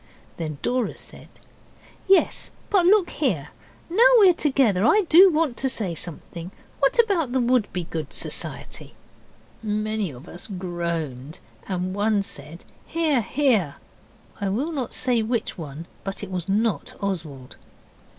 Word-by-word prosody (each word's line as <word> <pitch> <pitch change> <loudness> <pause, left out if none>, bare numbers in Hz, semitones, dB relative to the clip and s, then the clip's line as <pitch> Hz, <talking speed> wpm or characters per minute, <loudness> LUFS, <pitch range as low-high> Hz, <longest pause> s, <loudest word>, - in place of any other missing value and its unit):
Then 155 -3 -4
Dora 250 -2 -1
said, - - -10 0.8
'Yes, 385 0 +3 0.2
but 365 -4 +4
look 395 -2 +4
here. - - -1 0.4
Now 365 +7 0 0.2
we're 390 -5 +7
together 265 - +2
I 420 - +5
do 365 +5 +8
want 310 -6 0
to 265 - +1
say 205 -8 -1
something. 170 +1 -7 0.3
What 275 +8 +2
about 380 - +2
the 260 - +2
Wouldbegoods 180 - -1
Society?' - - -3 0.7
Many 215 -2 -1
of 135 +3 -12
us 175 - -6
groaned, 170 - -4 0.3
and 185 -1 -2
one 205 0 +1
said, 155 -1 -7 0.2
'Hear! 315 -6 +1
hear!' 220 - +1 0.6
I 200 - -1
will 265 +12 -1
not 265 -7 -3
say 245 -3 +2
which 230 +1 -2
one, 160 -1 -8 0.2
but 195 +1 -5
it 195 - -7
was 180 -1 -3
not 205 -5 0
Oswald. 155 -10 -5
210 Hz, 135 wpm, -24 LUFS, 170-270 Hz, 0.8 s, do